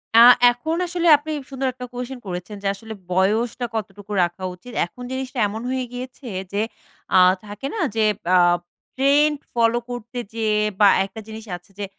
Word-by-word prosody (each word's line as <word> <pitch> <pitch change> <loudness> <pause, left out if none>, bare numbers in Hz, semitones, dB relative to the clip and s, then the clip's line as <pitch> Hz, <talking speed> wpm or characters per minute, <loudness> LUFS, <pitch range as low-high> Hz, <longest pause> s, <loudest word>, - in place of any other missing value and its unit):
আ - - +9 0.3
এখন 280 +7 -3
আসলে 345 0 -1
আপনি 310 +2 -7 0.2
সুন্দর 265 -1 -2
একটা 250 -1 -7
কুয়েসশন 250 +1 -5
করেছেন 180 +3 -5
যে 195 - 0
আসলে 220 +2 -9 0.2
বয়সটা 220 +7 +1
কতটুকু 205 -1 -6
রাখা 175 +2 -3
উচিত? 245 +7 -13
এখন 245 +8 -12
জিনিসটা 260 0 -4
এমন 220 +3 -5
হয়ে 260 -1 -1
গিয়েছে 255 +1 -8 0.3
যে 205 - +1 0.6
আ - - +8 0.3
থাকে 210 +6 -6
না? 440 - -3 0.2
যে 220 - +2 0.3
আব 175 -1 +5 0.4
ট্রেন্ড 290 +3 +3 0.2
ফলো 235 0 +3
করতে 245 0 -7 0.2
যে 225 -1 -1 0.3
বা 205 - +7 0.2
একটা 220 - -10
জিনিস 220 0 -8
আছে 175 +3 -25
যে 205 - -2
235 Hz, 170 wpm, -22 LUFS, 205-260 Hz, 0.6 s, আ